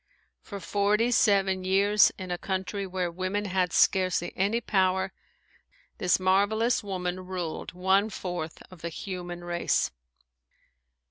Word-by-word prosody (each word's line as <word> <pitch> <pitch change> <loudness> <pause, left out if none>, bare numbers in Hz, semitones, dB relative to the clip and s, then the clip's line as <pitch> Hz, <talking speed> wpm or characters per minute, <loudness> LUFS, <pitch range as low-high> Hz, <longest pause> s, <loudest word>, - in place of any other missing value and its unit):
For 200 - -8
forty 205 +5 +1
seven 195 -5 +3
years, 200 +2 +4
in 185 -1 -6
a 175 - -1
country 190 +1 -3
where 180 -2 -2
women 185 +4 -2
had 185 -2 0
scarcely 185 -2 +2
any 205 +5 +1
power, 190 -3 +1 0.9
this 180 0 +3
marvelous 205 +6 +2
woman 185 -2 -4
ruled 180 -4 -4
one 190 +4 +2
fourth 175 -5 -5
of 180 -3 -13
the 170 - -3
human 175 -1 -6
race. 175 0 0
190 Hz, 125 wpm, -27 LUFS, 180-200 Hz, 0.9 s, years